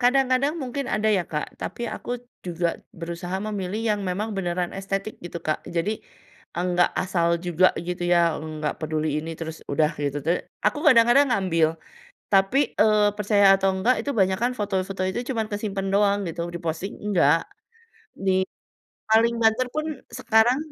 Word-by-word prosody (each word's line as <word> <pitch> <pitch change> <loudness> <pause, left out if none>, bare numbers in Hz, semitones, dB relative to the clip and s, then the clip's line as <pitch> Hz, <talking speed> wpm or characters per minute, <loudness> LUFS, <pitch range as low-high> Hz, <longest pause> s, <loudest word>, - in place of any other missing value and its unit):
kadang-kadang 260 +2 +3
mungkin 270 +1 -3
ada 215 +1 +1
ya, 195 -5 +2
Kak, 150 -2 -5
tapi 240 -1 -4
aku 240 +3 -5 0.3
juga 170 -1 -1 0.2
berusaha 170 +2 -5
memilih 205 -1 -3 0.2
yang - - -6
memang 200 +3 -2
beneran 175 -1 -2
estetik 195 +2 -3
gitu, 170 0 -6
Kak. 155 -1 -2
Jadi 170 +3 -1 0.6
nggak 175 0 +1
asal 170 -2 +1
juga 180 +1 +3
gitu 175 +1 -4
ya, 170 -2 +3
nggak 155 -1 -4
peduli 155 0 -1
ini 160 +2 -6
terus 160 -1 -7
udah 155 +1 +3
gitu, 145 0 -1
tapi 170 +3 +1 0.3
aku 210 +8 +2
kadang-kadang 245 +1 +6
ngambil. 170 -7 +2 0.6
Tapi, 195 +7 +4 0.2
eee, 210 -1 +5
percaya 205 -1 +2 0.2
atau 195 0 +3
enggak 230 +7 +3
itu 285 - -3
banyakan 190 +6 +2
foto-foto 195 -2 -2
itu 215 - -3
cuman 225 -4 -1
kesimpen 205 -2 -3
doang 200 0 +3
gitu 170 +1 -4
di-posting 170 +3 -4
enggak, 175 -4 +3 0.7
di 190 -1 +2 0.7
paling 230 +2 +4
banter 225 +3 +3
pun 310 0 -1 0.3
sekarang 225 +3 +3
195 Hz, 150 wpm, -24 LUFS, 170-220 Hz, 0.7 s, kadang-kadang